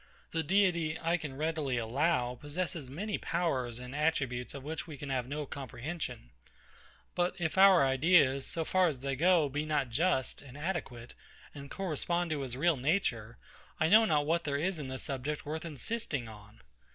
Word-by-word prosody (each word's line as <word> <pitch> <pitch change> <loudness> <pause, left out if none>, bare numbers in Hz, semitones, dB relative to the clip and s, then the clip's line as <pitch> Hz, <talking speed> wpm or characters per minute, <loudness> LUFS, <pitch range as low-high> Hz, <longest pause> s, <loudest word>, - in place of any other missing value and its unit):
The 165 - 0
Deity, 170 -2 +2
I 165 +1 +1
can 145 -5 -7
readily 155 -4 -1
allow, 125 +2 +1
possesses 145 +1 -4
many 200 +9 -3
powers 130 -9 -1
and 125 +2 -8
attributes 140 -6 -1
of 140 - -7
which 155 +3 -5
we 155 -3 -8
can 140 0 -6
have 125 -2 -1
no 150 +2 -3
comprehension: 130 - -6 0.8
But 175 0 0
if 160 -3 -2
our 190 -5 +7
ideas, 135 -1 +4
so 165 -1 -2
far 185 +1 +3
as 140 -6 -3
they 135 0 -2
go, 170 +1 +4
be 145 +2 -2
not 150 -5 -1
just, 140 0 +1
and 140 -1 -12
adequate, 145 -8 -4 0.4
and 140 -1 -9
correspondent 175 -1 -1
to 150 -2 -1
his 130 -2 -4
real 165 +1 +3
nature, 125 - 0 0.4
I 160 - +3
know 220 +4 +7
not 150 -7 +2
what 170 +2 +1
there 140 -2 -1
is 175 +3 -1
in 140 - -5
this 130 0 -5
subject 140 +2 -3
worth 155 +3 -4
insisting 150 - -3
on. 105 - -13
150 Hz, 175 wpm, -32 LUFS, 130-170 Hz, 0.8 s, our